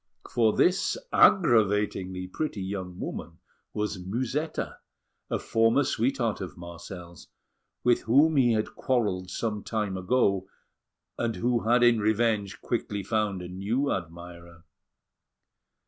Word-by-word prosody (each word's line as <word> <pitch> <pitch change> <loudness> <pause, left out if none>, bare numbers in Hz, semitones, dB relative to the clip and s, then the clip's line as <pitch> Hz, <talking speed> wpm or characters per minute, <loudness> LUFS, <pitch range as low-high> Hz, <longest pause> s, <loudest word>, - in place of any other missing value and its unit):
For 115 -3 +3
this 185 - +2 0.2
aggravatingly 105 - +3
pretty 110 -3 -3
young 95 -2 -5
woman 80 -1 -6 0.3
was 105 -2 -3
Musetta, 130 - -3 0.5
a - - 0
former 115 +5 +2
sweetheart 120 -4 0
of 90 -7 -7
Marcel's, 85 0 -10 0.6
with 120 -1 +3
whom 145 +7 +4
he 125 -4 +4
had 110 -1 -1
quarrelled 105 -8 -1
some 105 +2 -3
time 105 -4 -2
ago, 95 -1 +1 0.7
and 115 -1 -1
who 120 -1 0
had 120 +1 +5
in 120 -2 +5
revenge 110 -2 0
quickly 105 -4 -2
found 105 -3 -1
a - - -6
new 105 +10 -1
admirer. 85 -1 -7
105 Hz, 115 wpm, -27 LUFS, 95-120 Hz, 0.7 s, had